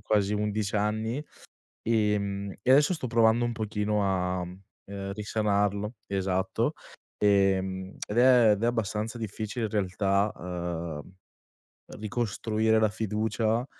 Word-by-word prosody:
quasi 105 Hz, 0 st, +1 dB
11 105 Hz, 0 st, -1 dB
anni, 110 Hz, +3 st, 0 dB, 0.7 s
ehm, 100 Hz, -3 st, 0 dB
e 125 Hz, -, +1 dB
adesso 145 Hz, +6 st, +5 dB
sto 155 Hz, -, -4 dB
provando 115 Hz, 0 st, +4 dB
un 120 Hz, -, -1 dB
pochino 105 Hz, -1 st, -1 dB
a, 95 Hz, -2 st, 0 dB
uhm, 95 Hz, +2 st, -8 dB
risanarlo, 105 Hz, +1 st, 0 dB
esatto. 95 Hz, -1 st, 0 dB, 0.5 s
Ehm, 95 Hz, -2 st, +2 dB
ed 105 Hz, -, -4 dB
è 120 Hz, -3 st, +6 dB
ed 105 Hz, +1 st, -1 dB
è -, -, +3 dB
abbastanza 115 Hz, -1 st, -1 dB
difficile 110 Hz, +1 st, -3 dB
in -, -, -7 dB
realtà, 100 Hz, 0 st, +1 dB
uhm, 85 Hz, -2 st, -5 dB, 0.8 s
ricostruire 110 Hz, 0 st, 0 dB
la 110 Hz, 0 st, +4 dB
fiducia, 110 Hz, +2 st, -1 dB
105 Hz, 115 wpm, -28 LUFS, 100-110 Hz, 0.8 s, è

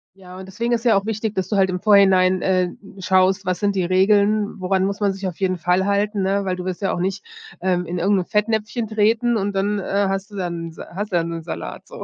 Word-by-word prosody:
Ja, 185 Hz, -1 st, -13 dB
und 190 Hz, -, -9 dB
deswegen 235 Hz, +5 st, -2 dB
ist 235 Hz, 0 st, -1 dB
ja 230 Hz, -, +5 dB
auch 195 Hz, -, -2 dB
wichtig, 220 Hz, 0 st, -3 dB
dass 190 Hz, -1 st, -2 dB
du -, -, -1 dB
halt 190 Hz, -1 st, +3 dB
im 180 Hz, 0 st, -2 dB
Vorhinein, 190 Hz, -3 st, +4 dB
äh, 185 Hz, -1 st, +1 dB, 0.3 s
schaust, 190 Hz, +1 st, +2 dB
was 180 Hz, -1 st, -1 dB
sind 200 Hz, -1 st, 0 dB
die 190 Hz, -, +1 dB
Regeln? 205 Hz, +3 st, +2 dB
Woran 190 Hz, 0 st, 0 dB
muss 200 Hz, +1 st, -3 dB
man 200 Hz, -2 st, +1 dB
sich 195 Hz, 0 st, -5 dB
auf 180 Hz, -, -7 dB
jeden 185 Hz, -2 st, 0 dB
Fall 180 Hz, +3 st, +1 dB
halten, 200 Hz, 0 st, 0 dB
ne? 195 Hz, +1 st, 0 dB
Weil 185 Hz, -1 st, -1 dB
du 180 Hz, 0 st, -7 dB
willst 185 Hz, 0 st, -4 dB
ja 195 Hz, -, 0 dB
auch -, -, -3 dB
nicht, 190 Hz, +2 st, -2 dB, 0.4 s
ähm, 180 Hz, -1 st, 0 dB
in 175 Hz, +1 st, -4 dB
irgend 195 Hz, +3 st, +2 dB
'n 180 Hz, -, -3 dB
Fettnäpfchen 220 Hz, +2 st, -1 dB
treten 225 Hz, +2 st, +2 dB
und 200 Hz, 0 st, -2 dB
dann, 205 Hz, +2 st, 0 dB
äh, 200 Hz, +1 st, 0 dB
hast 195 Hz, +2 st, -3 dB
du -, -, -10 dB
dann 170 Hz, -3 st, -4 dB
Sa 160 Hz, -, -10 dB
hast 205 Hz, +2 st, -4 dB
du -, -, -1 dB
dann 170 Hz, -1 st, 0 dB
den 165 Hz, -1 st, -5 dB
Salat 170 Hz, -, -7 dB
so. -, -, -9 dB
195 Hz, 260 wpm, -21 LUFS, 185-205 Hz, 0.4 s, ja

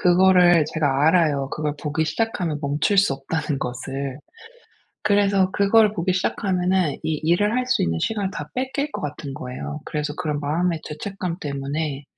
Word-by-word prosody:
그거를 180 Hz, -2 st, +5 dB
제가 145 Hz, -2 st, +2 dB
알아요 150 Hz, -6 st, +2 dB
그걸 150 Hz, -1 st, -2 dB
보기 155 Hz, +1 st, 0 dB
시작하면 175 Hz, -3 st, -1 dB
멈출 145 Hz, +8 st, +1 dB
수 195 Hz, -8 st, +4 dB
없다는 145 Hz, +1 st, -3 dB
것을. 135 Hz, +2 st, -4 dB, 0.8 s
그래서 200 Hz, -2 st, +3 dB
그걸 210 Hz, +1 st, +4 dB
보기 185 Hz, -1 st, 0 dB
시작하면은 185 Hz, -3 st, +1 dB
이 160 Hz, -, -1 dB
일을 205 Hz, +7 st, +2 dB
할 255 Hz, -, +1 dB
수 255 Hz, -, +2 dB
있는 80 Hz, -1 st, 0 dB
시간을 205 Hz, -3 st, -1 dB
다 150 Hz, -4 st, -6 dB
뺏길 265 Hz, +3 st, -2 dB
것 -, -, -4 dB
같은 145 Hz, -1 st, -5 dB
거예요. 130 Hz, +4 st, -6 dB
그래서 150 Hz, -1 st, -3 dB
그런 155 Hz, -5 st, -2 dB
마음의 160 Hz, +3 st, 0 dB
죄책감 180 Hz, +2 st, -5 dB
때문에 140 Hz, 0 st, -3 dB
160 Hz, 340 characters per minute, -23 LUFS, 145-190 Hz, 0.8 s, 그거를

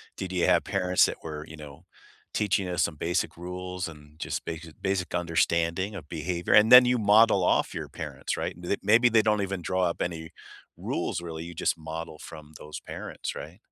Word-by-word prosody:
Did 95 Hz, -1 st, -5 dB
you 90 Hz, -2 st, +1 dB
have -, -, +4 dB
parents 90 Hz, 0 st, +2 dB
that -, -, -3 dB
were, 75 Hz, -1 st, -6 dB
you 80 Hz, -, -11 dB
know, 75 Hz, +2 st, -11 dB, 0.5 s
teaching 100 Hz, -2 st, 0 dB
us 90 Hz, -, +1 dB
some 80 Hz, -, -1 dB
basic 85 Hz, +4 st, -1 dB
rules 90 Hz, 0 st, -5 dB
and 75 Hz, -1 st, -15 dB
just 85 Hz, -, -4 dB
basic 80 Hz, -1 st, -8 dB
basic 95 Hz, -2 st, -1 dB
understanding 85 Hz, +3 st, 0 dB
of 80 Hz, -6 st, -8 dB
behavior? 85 Hz, +2 st, -2 dB
And 105 Hz, +1 st, +6 dB
then 125 Hz, 0 st, +11 dB
you 125 Hz, 0 st, +2 dB
model 105 Hz, -2 st, +5 dB
off -, -, +2 dB
your -, -, -5 dB
parents, -, -, -5 dB
right? -, -, -3 dB
They 90 Hz, +3 st, -2 dB
maybe 120 Hz, +3 st, +5 dB
they 115 Hz, -1 st, +5 dB
don't 105 Hz, -1 st, +1 dB
even 95 Hz, -2 st, -3 dB
draw 95 Hz, +2 st, 0 dB
up 85 Hz, -1 st, -1 dB
any 80 Hz, -1 st, -4 dB, 0.5 s
rules, 85 Hz, -, -3 dB
really, 80 Hz, -1 st, -6 dB
you 85 Hz, +1 st, -8 dB
just 80 Hz, -, 0 dB
model 80 Hz, 0 st, -7 dB
from 75 Hz, -1 st, -11 dB
those 75 Hz, -, -8 dB
parents, -, -, -6 dB
right? 85 Hz, +6 st, -9 dB
90 Hz, 195 wpm, -27 LUFS, 80-95 Hz, 0.5 s, then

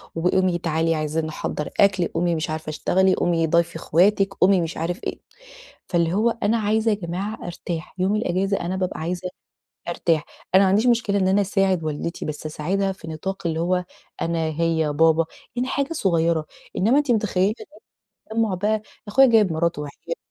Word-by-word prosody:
"وقومي 180 Hz, +1 st, +2 dB
تعالي 165 Hz, -1 st, 0 dB
عايزين 155 Hz, +1 st, -1 dB
نحضّر 155 Hz, -1 st, -4 dB
أكْل، 190 Hz, -3 st, +4 dB
قومي 175 Hz, -1 st, 0 dB
مش 155 Hz, 0 st, -3 dB
عارفة 155 Hz, 0 st, -4 dB
اشتغلي، 185 Hz, +4 st, +2 dB
قومي 165 Hz, -2 st, +1 dB
ضايفي 170 Hz, +1 st, +1 dB
أخواتِك، 195 Hz, +5 st, +2 dB
قومي 185 Hz, -1 st, +4 dB
مش 165 Hz, 0 st, -4 dB
عارف 175 Hz, +3 st, -3 dB
إيه." -, -, -4 dB, 0.7 s
فاللي 170 Hz, -1 st, +1 dB
هو 220 Hz, +4 st, +3 dB
أنا 220 Hz, +3 st, +3 dB
عايزة 220 Hz, +1 st, +1 dB
يا -, -, +2 dB
جماعة 190 Hz, +3 st, -5 dB
أرتاح 175 Hz, 0 st, -6 dB
يوم 195 Hz, +3 st, +2 dB
الإجازة 195 Hz, -1 st, 0 dB
أنا 180 Hz, +2 st, -2 dB
بابقى 185 Hz, -3 st, -2 dB
عايزة 180 Hz, +2 st, -3 dB, 0.6 s
أرتاح. 165 Hz, -2 st, 0 dB, 0.3 s
أنا 190 Hz, -, +7 dB
ما 190 Hz, -, +4 dB
عنديش 210 Hz, +6 st, +3 dB
مشكلة 225 Hz, -4 st, +2 dB
إن 190 Hz, -1 st, +2 dB
أنا 200 Hz, +2 st, +3 dB
أساعد 195 Hz, -4 st, +1 dB
والدتي 155 Hz, +2 st, -4 dB
بس 155 Hz, 0 st, -5 dB
أساعدها 190 Hz, +6 st, -1 dB
في 165 Hz, -3 st, -11 dB
نطاق 185 Hz, +4 st, -4 dB
اللي 160 Hz, 0 st, -1 dB
هو 180 Hz, +1 st, +1 dB, 0.4 s
أنا، 165 Hz, -1 st, 0 dB
هي، 160 Hz, -2 st, +1 dB
بابا 160 Hz, +2 st, +4 dB, 0.3 s
يعني 255 Hz, +2 st, -1 dB
حاجة 280 Hz, +4 st, -1 dB
صغيرة 170 Hz, -, +1 dB, 0.3 s
إنما 230 Hz, +9 st, +3 dB
أنتِ 290 Hz, -4 st, 0 dB
متخيلّة 210 Hz, -2 st, +2 dB, 0.8 s
التجمع 220 Hz, -2 st, 0 dB
بقى 210 Hz, +3 st, 0 dB, 0.3 s
أخويا 270 Hz, +6 st, +6 dB
جايب 215 Hz, -7 st, +4 dB
مراته 165 Hz, -1 st, 0 dB
وعياله 150 Hz, -, -6 dB
180 Hz, 170 wpm, -23 LUFS, 165-200 Hz, 0.8 s, أنا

